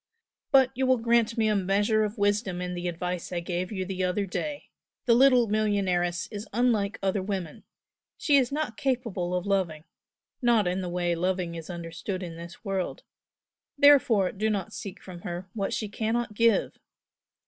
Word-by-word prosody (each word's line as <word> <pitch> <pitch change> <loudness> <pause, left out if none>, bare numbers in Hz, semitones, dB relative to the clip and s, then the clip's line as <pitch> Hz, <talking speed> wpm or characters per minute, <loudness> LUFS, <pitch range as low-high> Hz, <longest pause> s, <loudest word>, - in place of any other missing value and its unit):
"But 265 -2 +5
you 260 +1 0
will 260 0 +4
grant 235 0 +2
me 220 -1 +3
a 215 - +2
measure 205 +3 +2
of 210 +2 -3
wisdom 205 -2 +1
in 180 0 -3
the 175 0 -3
advice 180 +1 -4
I 175 - -1
gave 175 +2 -3
you 190 -3 -3
the 185 0 -3
other 185 +3 0
day 290 +10 -5 0.3
the 235 - +5
little 250 -1 +5
millionairess 190 -5 0
is 210 +1 -6
unlike 220 -3 +1
other 195 0 +1
women 185 -5 -5 0.5
she 290 - +2
is 260 -2 +2
not 285 -6 -2
capable 225 -9 -1
of 180 +1 -2
loving, 185 -6 0 0.6
not 235 -4 +4
in 180 +1 0
the 180 - -4
way 175 0 0
loving 180 0 -1
is 165 0 -8
understood 175 +2 -5
in 170 -2 -6
this 170 +6 -11
world, 195 -2 -3 0.7
therefore 255 -9 +5
do 215 +2 -1
not 200 -4 -2
seek 200 -1 -7
from 180 -2 -9
her 175 0 -5
what 200 -3 -2
she 215 - -2
cannot 220 +2 -2
give! 230 0 +2
200 Hz, 175 wpm, -27 LUFS, 180-230 Hz, 0.7 s, But